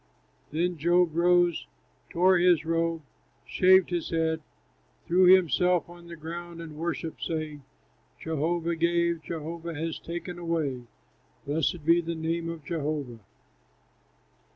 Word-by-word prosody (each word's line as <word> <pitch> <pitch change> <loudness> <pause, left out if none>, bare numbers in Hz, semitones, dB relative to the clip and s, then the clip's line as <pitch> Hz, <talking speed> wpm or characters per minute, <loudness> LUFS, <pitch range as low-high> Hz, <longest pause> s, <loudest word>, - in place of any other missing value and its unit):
Then 170 +3 -1
Job 175 +1 +3
rose, 175 0 +3 0.4
tore 185 +1 +4
his 175 -3 +4
robe, 165 -1 -1 0.4
shaved 185 0 +4
his 175 -2 -2
head, 160 -1 0 0.6
threw 180 +2 +4
himself 180 -1 +4
on 175 0 -13
the 170 - -8
ground 170 +1 -8
and 160 -2 -8
worshipped, 165 0 -4
saying: 155 -3 -4 0.6
"Jehovah 165 +2 -1
gave, 170 0 +1
Jehovah 165 +1 -6
has 160 +2 -4
taken 175 +1 -6
away; 155 -7 -2 0.6
Blessed 155 +2 -1
be 170 +1 +5
the 170 0 -4
name 165 +1 -2
of 165 -3 -7
Jehovah!" 145 -7 -3
170 Hz, 120 wpm, -27 LUFS, 160-175 Hz, 0.6 s, be